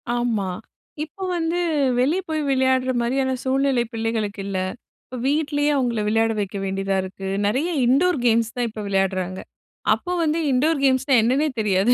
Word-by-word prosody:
ஆமா, 230 -5 0 0.5
இப்ப 345 +5 -7
வந்து 335 0 -1 0.4
வெளியே 300 +9 +2
போய் 310 -1 -1
விளையாடுற 260 -1 +2
மாரியான 260 +2 0
சூழ்நிலை 265 -1 +2
பிள்ளைகளுக்கு 225 -3 -2
இல்ல. 195 -1 -3 0.5
இப்ப 255 - -8
வீட்லேயே 290 0 +1
அவங்கள 245 -4 0
விளையாட 225 +1 +2
வைக்க 200 -1 -3
வேண்டியதா 195 0 -1
இருக்கு. 190 +1 -7 0.2
நெறைய 265 +11 0 0.2
இன்டோர் 300 +8 +3
கேம்ஸ் 230 -1 +2
தான் 245 -1 0
இப்ப 215 0 -7
விளையாடுறாங்க. 190 -1 -1 0.5
அப்போ 360 - -4
வந்து 315 +1 +1
"இன்டோர் 285 +3 +2
கேம்ஸ்னா 265 +1 +2
என்னன்னே 265 +7 +2
தெரியாது" 205 +2 +3
245 Hz, 145 wpm, -22 LUFS, 210-280 Hz, 0.5 s, இன்டோர்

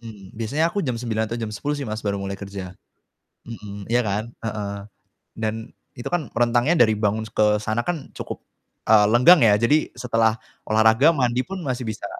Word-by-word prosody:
Hmm, 105 -5 -12
biasanya 115 +9 -1
aku 205 - -1
jam 125 -9 -2
9:00 110 -2 -2
atau 115 - -4
jam 110 -2 -4
10:00 145 +8 -3
sih, 145 - -4
Mas, 110 -2 -4
baru 100 -2 -2
mulai 100 0 -4
kerja. 100 -2 -7 0.7
Mhm, 105 -3 -8
ya 120 +2 +2
kan? 110 +2 -3
Heeh. 105 -2 -4 0.6
Dan, 110 -1 -2 0.4
itu 120 - -5
kan 175 -6 -1
rentangnya 120 +6 +2
dari 110 - +1
bangun 105 +1 -1
s - - -14
ke 105 0 +3
sana 110 +2 -2
kan, 165 -1 -5
cukup, - - -6 0.5
eee, 105 -1 +6
lenggang 125 +7 +7
ya. 105 -2 +5
Jadi, 145 +8 +2
setelah 115 -2 +1 0.2
olahraga, 110 +7 +4
mandi 125 -5 +1
pun 190 +5 -7
masih 130 -1 -2
bisa 110 - -6
110 Hz, 185 wpm, -23 LUFS, 105-125 Hz, 0.7 s, lenggang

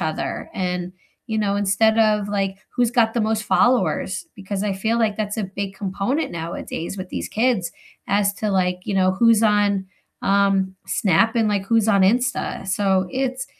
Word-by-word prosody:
other 155 0 -3
and, 180 -1 -3 0.3
you 220 - -2
know, 200 -1 0
instead 210 +3 +2
of 210 -2 +3
like 195 -1 -1 0.2
who's 245 -2 +2
got 230 -3 +2
the 235 - +1
most 220 0 0
followers 250 +8 +1
because 195 0 -5
I 200 - 0
feel 220 +5 -1
like 215 -3 +1
that's 210 0 -2
a 215 - -1
big 195 +1 -5
component 200 +10 -2
nowadays 170 +1 -5
with 185 -1 -6
these - - -4
kids 220 -7 0 0.4
as 200 0 +2
to, 210 +1 -2
like, 180 -1 0
you 200 - -3
know, 185 -1 +3
who's 230 +2 +4
on, 205 -2 +2 0.4
um, 195 -1 +2
Snap 225 +3 +2
and, 225 -2 +2
like, 200 -1 -1
who's 225 -1 +2
on 200 -2 +4
Insta. 240 -1 0
So 190 -1 +1
it's 260 0 -2
200 Hz, 175 wpm, -22 LUFS, 190-225 Hz, 0.4 s, who's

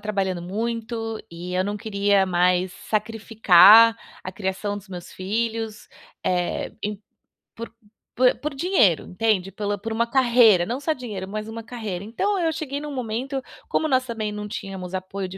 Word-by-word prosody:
trabalhando 195 -4 -2
muito, 225 +3 -3
e 175 +2 -7
eu 185 - +2
não 205 +1 -3
queria 200 -2 +1
mais 180 0 +2 0.2
sacrificar 220 0 +6 0.3
a 185 - -5
criação 200 +1 -3
dos 200 0 -16
meus 180 -2 -9
filhos, 220 +2 -3 0.4
eh, 180 -1 -1
em 210 -1 -4 0.6
por 230 0 -7 0.5
po 255 - -1 0.2
por 295 -1 -4
dinheiro, 270 - +3
entende? 195 -1 0
Pela 205 -1 -3
por 225 +3 -6
uma 235 +1 0
carreira, 235 -8 +5
não 245 +6 -3
só 315 +2 0
dinheiro, 210 -8 -6
mas 215 +2 -5
uma 230 +1 -6
carreira. 215 -7 -5
Então, 385 - -1
eu 330 -2 +1
cheguei 285 -3 -4
num 295 -1 -6
momento 255 +3 -3 0.3
como 315 - +1
nós 260 -2 +2
também 220 -3 -3
não 210 0 -5
tínhamos 190 -2 -7
apoio 190 +1 -4
de 190 - -9
215 Hz, 165 wpm, -23 LUFS, 190-235 Hz, 0.6 s, sacrificar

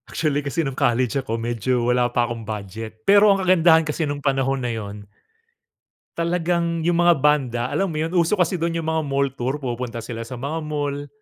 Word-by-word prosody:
Actually, 150 -3 0
kasi 145 +3 -2
nung 135 - -3
college 130 0 +1
ako 115 -3 -3
medyo 120 +1 -1
wala 125 0 +2
pa 120 0 +1
akong 120 -1 -5
budget, 110 +1 -7
pero 205 +1 +6
ang 195 -1 +1
kagandahan 165 -3 +5
kasi 150 0 -2
nung 145 - -2
panahon 135 -1 +1
na 120 - -1
yun 105 -2 -7 1.1
talagang 170 -1 0
yung 170 0 +1
mga 175 0 +5
banda, 135 -6 +2
alam 195 - 0
mo 165 - -5
yun? 160 +2 -1
Uso 175 +2 +2
kasi 180 -1 0
dun 165 0 -1
yung 165 - -2
mga 160 0 +1
mall 140 0 0
tour. 130 +1 -3
Pumupunta 120 -2 -4
sila 115 -1 -6
sa 125 - -7
mga 140 +6 -4
mall, 145 -2 -3
140 Hz, 200 wpm, -22 LUFS, 120-165 Hz, 1.1 s, pero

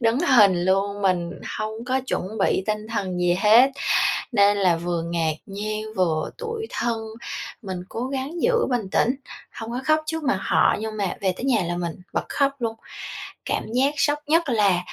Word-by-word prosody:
đứng 230 +2 +2
hình 205 - +5
luôn, 200 +2 +1
mình 175 -3 +1 0.3
hông 220 +2 -4
có 260 +1 +1
chuẩn 210 0 -3
bị 195 - +2
tinh 215 0 -2
thần 190 -5 -2
gì 175 0 +3
hết, 230 +6 +7 0.6
nên 205 -2 +4
là 185 -3 +3
vừa 170 0 -2
ngạc 165 -2 0
nhiên, 215 +1 -4
vừa 165 -4 +1
tủi 455 -2 -4
thân. 235 -1 -1 0.6
Mình 190 -4 -5
cố 240 +3 -3
gắng 275 +5 -4
giữ 475 -1 +3
bình 235 -6 -1
tĩnh, 250 +3 +2 0.4
hông 225 0 -6
có 245 - -2
khóc 310 +2 +3
trước 320 0 -3
mặt 195 -8 +1
họ - - +3
nhưng 220 0 -4
mà 195 -3 -1
về 190 -2 +1
tới - - -7
nhà 230 -8 +2
là 175 0 -2
mình 170 -2 -3 0.2
bật - - -1
khóc 280 -1 +2
luôn. 225 -1 -2 0.7
Cảm - - -1
giác 270 +4 +3
sốc 290 +1 +2
nhất 325 -1 +3
là 200 -6 +3
215 Hz, 190 wpm, -24 LUFS, 190-260 Hz, 0.7 s, hết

